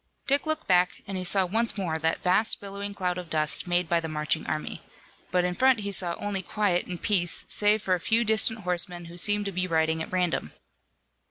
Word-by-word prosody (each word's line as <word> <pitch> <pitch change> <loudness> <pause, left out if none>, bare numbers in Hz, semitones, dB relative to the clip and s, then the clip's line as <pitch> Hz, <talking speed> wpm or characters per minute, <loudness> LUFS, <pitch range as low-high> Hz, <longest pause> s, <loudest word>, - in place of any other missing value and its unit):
Dick 280 +3 +1
looked 315 0 0
back, 180 -1 +2
and 195 - -6
he 185 - -3
saw 190 +1 +2
once 225 +5 0
more 165 -5 -2
that 160 +1 -1
vast 185 +5 +3
billowing 200 0 -7
cloud 180 -2 -2
of 175 -2 -9
dust 155 -3 +1
made 175 0 +1
by 170 +1 +2
the 165 - -5
marching 155 0 -2
army. 155 -1 -4 0.5
But 180 -1 +1
in 180 - -1
front 260 +2 +3
he 200 0 -4
saw 175 -3 +3
only 205 -2 -3
quiet 190 -2 -1
and 180 -2 -6
peace, 180 -5 +1
save 210 0 +2
for 185 - +1
a 180 - 0
few 225 +6 +1
distant 220 0 +2
horsemen 180 -1 -1
who 170 +1 -11
seemed 205 +2 +3
to 200 - -3
be 185 0 -2
riding 160 -1 0
at - - -6
random. 180 -2 -1
180 Hz, 220 wpm, -26 LUFS, 175-205 Hz, 0.5 s, vast